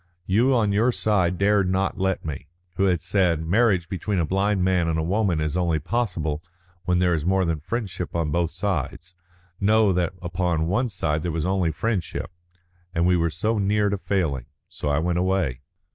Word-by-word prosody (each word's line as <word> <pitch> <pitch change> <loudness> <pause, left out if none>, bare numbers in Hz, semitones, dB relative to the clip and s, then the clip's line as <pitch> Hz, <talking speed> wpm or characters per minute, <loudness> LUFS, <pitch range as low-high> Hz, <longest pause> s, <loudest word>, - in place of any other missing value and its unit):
You 120 +8 +3
on 110 -4 +2
your 110 +5 +3
side 95 -6 +1
dared 100 -1 +3
not 95 +1 0
let 95 -2 -1
me, 75 -2 -5 0.3
who 100 - +2
had 90 -4 +1
said 90 -3 +1
'Marriage 95 -1 +2
between 95 +2 -2
a 85 - +2
blind 95 +2 +1
man 90 -2 +2
and 80 -1 0
a 80 - 0
woman 95 -1 +1
is 75 +1 -1
only 85 -3 +1
possible 85 - -2 0.4
when 90 0 +2
there 90 -1 +3
is 80 -3 -1
more 95 +2 +2
than 80 -2 -1
friendship 95 0 -4
on 80 -3 0
both 85 +1 +1
sides,' 85 -2 -3 0.5
know 105 0 +4
that 90 -1 0
upon 85 -2 -1
one 120 +9 0
side 80 -6 -1
there 85 +1 -2
was 80 0 -2
only 95 -3 +1
friendship, 90 -1 -2 0.6
and 85 +1 +2
we 90 0 +4
were 85 -1 +1
so 110 +7 -1
near 105 +1 +2
to 100 - -1
failing. 80 -12 -1 0.2
So 75 - -4
I 70 - +2
went 85 +2 0
away." 90 -9 0
90 Hz, 190 wpm, -24 LUFS, 80-100 Hz, 0.6 s, know